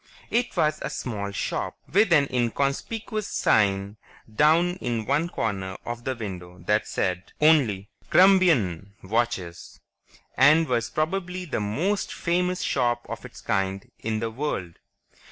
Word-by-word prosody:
It 240 +1 0
was 155 0 +2
a - - -3
small 100 -5 -4
shop, 100 - -3 0.2
with 205 0 +4
an 145 -4 +5
inconspicuous 140 - -1
sign 100 0 +1 0.4
down 170 +6 +4
in 120 -8 -3
one 150 +7 +1
corner 95 - -3
of 120 0 -6
the 130 - -1
window 90 -6 -7
that 105 +2 +1
said 90 -1 -2
only, 130 -11 +3 0.2
"KRUMBEIN 150 - +4
watches," 95 -5 -2 0.6
and 155 +5 +5
was 120 -3 0
probably 180 +3 -2
the 150 - -2
most 160 - -1
famous 180 +1 0
shop 120 -3 0
of - - -6
its - - -11
kind 95 0 -2
in 110 0 -2
the 115 -1 -2
world. 110 - -4
120 Hz, 135 wpm, -25 LUFS, 100-165 Hz, 0.6 s, an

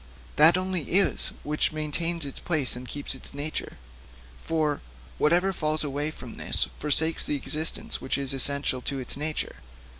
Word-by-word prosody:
That 160 +4 +8
only 185 -1 -1
is 195 +1 +4 0.2
which 150 +1 -1
maintains 155 +2 -1
its 140 - -8
place 150 -8 -1
and 125 +1 -9
keeps 145 +1 -3
its 130 - -8
nature; 150 +2 -5 1.4
whatever 175 +5 +2
falls 155 -2 -1
away 145 +1 -2
from 125 -6 -10
this - - +2
forsakes 160 +2 +3
the 150 - 0
existence 155 +3 0
which 130 - -2
is 140 -1 0
essential 135 -1 +2
to 140 +2 -4
its 130 -2 -2
nature. 150 +2 -4
150 Hz, 150 wpm, -26 LUFS, 140-160 Hz, 1.4 s, That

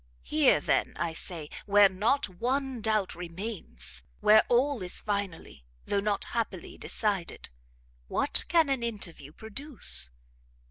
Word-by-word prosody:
Here, - - +4
then, - - +1
I 170 -1 -1
say, 160 -2 -4 0.2
where 205 0 +7
not 210 +9 +1
ONE 250 +6 -2
doubt 215 -3 +1
remains, 170 - -3 0.2
where 215 +1 +7
ALL 250 0 +2
is 180 -1 0
finally, 200 - -4 0.2
though 200 - +1
not 205 0 0
happily 215 -6 -4
decided, 200 -5 -1 0.6
what - - 0
can 330 -4 +4
an 270 -3 +1
interview 195 -11 -5
produce? 220 - -1
205 Hz, 125 wpm, -29 LUFS, 175-235 Hz, 0.6 s, where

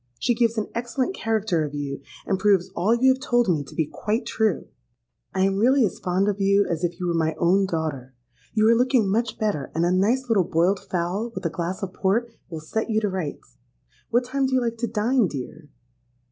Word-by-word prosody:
She 245 - +1
gives 230 -1 +1
an 215 - 0
excellent 240 +7 -2
character 215 - 0
of 150 -1 -5
you, 140 -1 -4 0.2
and 195 -2 0
proves 190 -2 +3
all 205 +7 +2
you 260 +2 +4
have 260 - -10
told 240 -4 +2
me 160 -6 +1
to - - -13
be 160 - +1
quite 220 - -2
true. 220 -4 0 0.6
I 190 - -1
am 195 0 +2
really 250 +4 +4
as 195 - -4
fond 185 +2 0
of 205 -1 -1
you 200 +1 +4
as 170 0 -3
if 175 0 -2
you 180 - -3
were 175 - 0
my 160 -1 0
own 190 +4 +3
daughter. 150 -7 -4 0.4
You 215 0 +4
are 230 - +6
looking 250 -3 +3
much 225 +1 0
better; 205 -11 -1
and 165 +1 +2
a 175 - +2
nice 225 +8 +2
little 215 -5 +3
boiled 175 +4 +1
fowl, 185 +6 -3
with 190 0 -6
a 165 - 0
glass 175 +4 -4
of 185 -1 -4
Port, 230 +5 0 0.2
will 160 -3 -6
set 220 +10 -3
you 220 -1 +2
to 210 -2 -1
rights. 185 -6 -6 0.5
What 240 +1 +2
time 270 +2 0
do 260 - 0
you 255 - +3
like 230 -1 -2
to 235 +1 -2
dine, 225 +1 +1
dear?' 145 +2 -8
200 Hz, 225 wpm, -24 LUFS, 170-230 Hz, 0.6 s, are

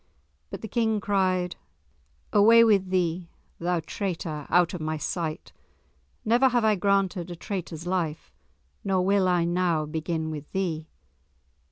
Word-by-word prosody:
But - - -7
the 220 - -5
King 220 -1 0
cried, 185 -3 0 0.8
"Away 225 +3 +7
with 200 -4 +3
thee, 175 -2 -1 0.3
thou 175 0 0
traitor, 160 -4 -4
out 175 0 +3
of 175 - -5
my 155 0 -2
sight! 160 0 -4 0.7
Never 245 +4 +4
have 240 -2 +1
I 215 - +4
granted 195 -2 0
a 175 - -6
traitor's 170 -3 -6
life, 175 -4 -3 0.5
nor 190 -2 +1
will 195 -1 +3
I 180 -2 +2
now 170 -3 +1
begin 160 +1 -3
with 150 -1 -8
thee!" 165 -5 -2
180 Hz, 140 wpm, -26 LUFS, 165-200 Hz, 0.8 s, Away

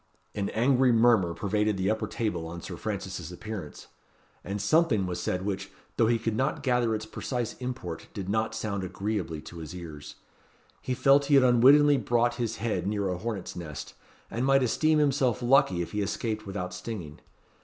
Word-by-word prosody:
An 100 -2 -2
angry 125 +2 +3
murmur 115 -7 +4
pervaded 105 +1 0
the 95 +2 +1
upper 110 - -2
table 90 -8 -2
on 85 +1 -7
Sir 90 +1 -7
Francis's 95 -4 -5
appearance; 95 -4 -7 0.6
and 100 +3 -4
something 110 - +3
was 90 -1 -3
said 90 +2 -2
which, 95 -1 -3 0.3
though 115 - +4
he 115 0 +3
could 115 -1 -2
not 135 +6 -1
gather 125 -3 +2
its 110 0 -4
precise 120 +1 -3
import 125 -10 -5
did 95 -3 -6
not 110 +2 0
sound 100 -3 -3
agreeably 95 -4 -3
to 85 - -10
his 80 +2 -8
ears. 80 -5 -9 0.7
He 130 - -2
felt 140 +2 +4
he 145 0 +4
had 135 - +7
unwittingly 140 +4 +6
brought 120 +1 +1
his 115 -2 -1
head 105 -5 -2
near 100 -2 -1
a 90 - -2
hornet's 105 -3 -4
nest, 80 -5 -7 0.4
and 120 - -2
might 135 0 +4
esteem 155 +6 +2
himself 135 -5 +2
lucky 120 -8 +4
if - - -9
he 105 - -1
escaped 110 +1 -3
without 90 -2 -4
stinging. 90 -5 -7
110 Hz, 180 wpm, -28 LUFS, 90-120 Hz, 0.7 s, had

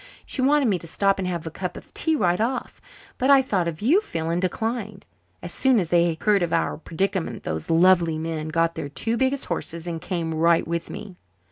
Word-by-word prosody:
She 265 - -3
wanted 280 0 +3
me 195 -5 +1
to 170 - -8
stop 195 +4 +1
and 185 - -2
have 170 -3 -3
a 160 - -5
cup 180 +2 -5
of - - -13
tea 320 -1 +1
right 180 - +1
off, 250 +3 -2 0.4
but 260 +1 +1
I 275 -1 +7
thought 190 -9 0
of 165 +3 -5
you, 325 - +4
Phil, 165 - -3
and 170 +1 0
declined. 215 +2 -3 0.4
As 175 - -5
soon 265 -2 +3
as 175 -4 -2
they 170 -2 +3
heard 210 -2 +3
of 170 -2 -1
our - - 0
predicament 165 - -2
those 80 0 -4
lovely 170 -1 +4
men 160 -1 -3
got 165 +1 +1
their 145 - -5
two 225 +10 -2
biggest 265 +2 0
horses 170 -1 -4
and 165 -2 -4
came 165 -3 -3
right 165 +1 +3
with 170 0 -3
me." 185 -3 -8
175 Hz, 220 wpm, -24 LUFS, 165-220 Hz, 0.4 s, I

